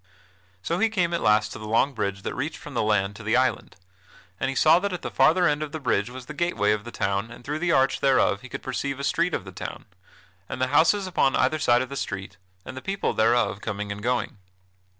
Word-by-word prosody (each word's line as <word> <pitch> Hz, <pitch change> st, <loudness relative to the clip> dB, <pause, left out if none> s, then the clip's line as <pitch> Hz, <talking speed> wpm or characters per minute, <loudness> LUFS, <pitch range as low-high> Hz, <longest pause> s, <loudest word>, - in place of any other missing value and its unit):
So 170 Hz, -, -1 dB
he 225 Hz, +2 st, +3 dB
came 180 Hz, -5 st, 0 dB
at 170 Hz, -, -1 dB
last 105 Hz, 0 st, +3 dB
to -, -, -8 dB
the 110 Hz, -, -7 dB
long 115 Hz, +6 st, +2 dB
bridge 100 Hz, -4 st, -3 dB
that -, -, -3 dB
reached 145 Hz, +5 st, -4 dB
from 150 Hz, -, -10 dB
the 120 Hz, -, 0 dB
land 105 Hz, -2 st, +1 dB
to -, -, -10 dB
the 110 Hz, +2 st, 0 dB
island, 130 Hz, 0 st, 0 dB, 0.6 s
and 130 Hz, -, 0 dB
he 135 Hz, -, -3 dB
saw 160 Hz, +5 st, +5 dB
that 200 Hz, +1 st, -2 dB
at 180 Hz, -, -5 dB
the -, -, -4 dB
farther 175 Hz, +2 st, +4 dB
end 150 Hz, -1 st, 0 dB
of 150 Hz, -1 st, -5 dB
the 155 Hz, -, -3 dB
bridge 115 Hz, -5 st, 0 dB
was 125 Hz, 0 st, -9 dB
the 150 Hz, -, -8 dB
gateway 145 Hz, -11 st, +1 dB
of 105 Hz, 0 st, -1 dB
the 120 Hz, -, -7 dB
town 100 Hz, +1 st, -1 dB
and 120 Hz, +1 st, -13 dB
through 150 Hz, +2 st, -3 dB
the 175 Hz, 0 st, +1 dB
arch 135 Hz, -3 st, +3 dB
thereof 130 Hz, -7 st, +2 dB
he 130 Hz, -, -11 dB
could -, -, -7 dB
perceive 140 Hz, +1 st, -3 dB
a -, -, -4 dB
street 170 Hz, +4 st, +1 dB
of -, -, -5 dB
the 95 Hz, -, -9 dB
town, 90 Hz, -, -7 dB, 0.6 s
and -, -, -5 dB
the 130 Hz, 0 st, +1 dB
houses 190 Hz, +6 st, +4 dB
upon 180 Hz, -7 st, +1 dB
either 145 Hz, +5 st, +2 dB
side 120 Hz, -2 st, +3 dB
of 130 Hz, -, -8 dB
the 140 Hz, -, -6 dB
street, 100 Hz, -5 st, -5 dB, 0.3 s
and -, -, -8 dB
the 130 Hz, -, -7 dB
people 195 Hz, +4 st, -2 dB
thereof 115 Hz, -2 st, +2 dB
coming 105 Hz, -1 st, -4 dB
and 100 Hz, +1 st, -6 dB
going. 120 Hz, -2 st, -1 dB
130 Hz, 250 wpm, -25 LUFS, 105-155 Hz, 0.6 s, saw